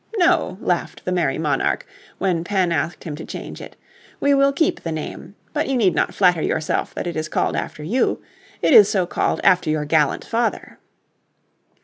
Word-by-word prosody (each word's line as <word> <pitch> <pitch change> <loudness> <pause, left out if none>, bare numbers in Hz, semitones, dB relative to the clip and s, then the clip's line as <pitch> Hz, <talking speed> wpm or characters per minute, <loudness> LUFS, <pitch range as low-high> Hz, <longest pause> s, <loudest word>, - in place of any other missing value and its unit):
"No," 350 - +2
laughed 175 -1 -2
the 180 - -1
merry 170 -7 0
monarch, 150 -4 0 0.3
when 180 -4 0
Penn 185 -1 0
asked 170 +1 -2
him 155 -3 -5
to 160 - -7
change - - -8
it, - - -10 0.4
"we 280 - +3
will 275 0 +4
keep 300 +3 0
the 165 - -4
name, 160 +4 -6 0.2
but 300 0 -1
you 270 - +1
need 195 -7 +3
not - - 0
flatter 180 -4 +3
yourself 155 0 -1
that - - -4
it 175 - -4
is 155 0 -3
called - - 0
after 150 - -4
you. 225 +12 0 0.4
It - - +4
is 210 -4 +8
so 190 -3 +1
called - - -1
after 180 -3 +4
your 155 -1 0
gallant 150 -1 +1
father." 230 0 -2
180 Hz, 190 wpm, -21 LUFS, 160-230 Hz, 0.4 s, is